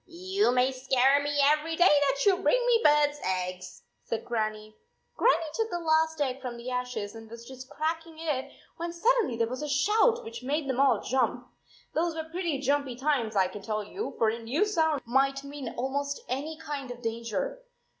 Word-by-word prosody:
" - - -46 0.3
You 400 -8 +4
may 250 +1 +3
scare 265 +1 +3
me 290 0 -1
every 305 +3 +2
day 350 - +4
that 285 -1 +3
you 390 -2 +5
bring 385 +6 +3
me 475 -2 +4
bird 295 -1 +5
s 295 - -13
eggs," 185 0 -3 0.2
said 230 - -4
Grannie. 215 -2 -3 0.4
Grannie 460 -8 +3
took 450 +3 -1
the 350 - -2
last 320 -1 +1
egg 270 -2 -1
from 245 -2 -5
the 240 +2 -6
ashes 250 -5 -3
and 225 -1 -11
was 235 +1 -10
just 260 0 -10
cracking 325 +1 -3
it 280 -4 -3 0.3
when 340 0 -3
suddenly 430 - +2
there 230 - +2
was 255 +3 -5
a 300 - -3
shout 420 - +3
which 230 +1 -8
made 285 +3 -2
them 260 -1 -1
all 265 -6 +4
jump. 250 -1 0 0.5
Those 330 +1 0
were 320 - -3
pretty 335 -1 -2
jumpy 280 -1 0
times, 255 -5 0
I 190 -2 +4
can 195 +2 -9
tell 215 +1 -2
you, 390 - -6
for 225 - +3
a 230 +2 -3
new 260 - 0
sound 320 -8 +1
might 275 +3 +1
mean 280 -1 -6
almost 280 +3 -2
any 290 +5 -3
kind 295 -4 -6
of 245 0 -8
danger. 230 - -3
275 Hz, 200 wpm, -28 LUFS, 240-320 Hz, 0.5 s, you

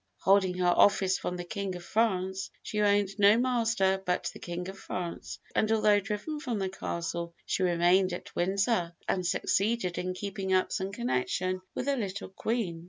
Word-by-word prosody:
'Holding 190 -1 +4
her 180 - 0
office 190 -2 +4
from 180 - -3
the 175 - -4
King 195 +1 -4
of 175 -1 -9
France, 190 -3 0
she 210 - -2
owned 205 -1 +3
no 205 +2 +7
master 225 -6 +2
but 180 -1 -1
the - - -11
King 175 +1 -5
of 195 0 -8
France;' 175 -2 -5 0.2
and 215 - +1
although 215 -2 +4
driven 210 +10 -4
from 245 -6 -3
the 190 -1 -1
Castle, 170 -2 -4
she - - -1
remained 180 +1 +3
at 175 - -7
Windsor, 190 -1 +1
and 185 - 0
succeeded 195 +1 0
in 185 0 -3
keeping 195 -1 -3
up 185 0 +2
some 190 -1 -2
connection 155 +8 -1
with - - -2
the 280 0 +1
little 200 -3 -4
Queen. 190 -3 -2
190 Hz, 175 wpm, -29 LUFS, 180-210 Hz, 0.2 s, no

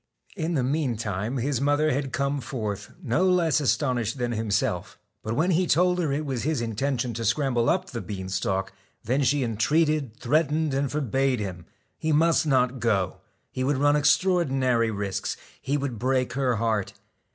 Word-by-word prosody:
In 170 -2 -2
the 135 - +1
meantime 120 -5 -1
his 130 +1 -1
mother 145 +2 +2
had 135 0 -2
come 140 +1 -1
forth, 105 -6 -4
no 135 +6 +1
less 170 -4 +3
astonished 130 -4 0
than 120 -1 -1
himself. 105 -4 -1 0.2
But 110 +1 -3
when 170 +7 +2
he 180 +1 +2
told 180 +3 +3
her 160 -5 0
it 150 +2 -1
was 130 -4 -2
his 155 -2 0
intention 120 +2 -1
to 115 +1 -4
scramble 120 +1 +1
up 185 +1 0
the 115 - -4
bean 95 -3 -6
stalk, 95 0 -2 0.3
then 130 +6 +1
she 140 +1 +2
entreated, 140 +2 +1
threatened, 155 0 +1
and 135 0 0
forbade 135 -2 0
him 90 -4 -6 0.3
he 160 - -1
must 160 +1 +3
not 130 -2 +2
go. 105 -5 0 0.3
He 130 - -3
would 140 +1 +1
run 145 +2 +4
extraor 175 +5 +3
dinary 130 -5 +1
risks; 100 -2 -3 0.2
he 140 +2 0
would 135 -6 -3
break 130 0 0
her 130 -3 +1
heart. 110 -3 -1
130 Hz, 175 wpm, -26 LUFS, 115-150 Hz, 0.3 s, run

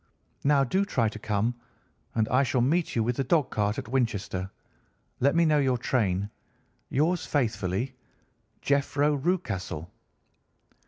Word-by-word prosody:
Now 140 -1 +4
do 190 +10 +1
try 120 - +1
to 110 - -9
come, 110 +2 0 0.6
and 110 -1 +2
I 130 - +4
shall 130 -1 +1
meet 160 +7 +1
you 115 - +2
with 120 +2 -1
the 135 - +1
dog 145 0 +2
cart 105 0 0
at - - -5
Winchester. 110 -7 -1 0.7
Let 140 +4 +3
me 170 0 +4
know 155 -2 +4
your 130 -3 +2
train. 105 -5 0 0.6
Yours 165 +5 +1
faithfully, 115 - -1 0.7
"'JEPHRO 140 +1 +2
RUCASTLE. 130 - -2
125 Hz, 140 wpm, -27 LUFS, 110-145 Hz, 0.7 s, Now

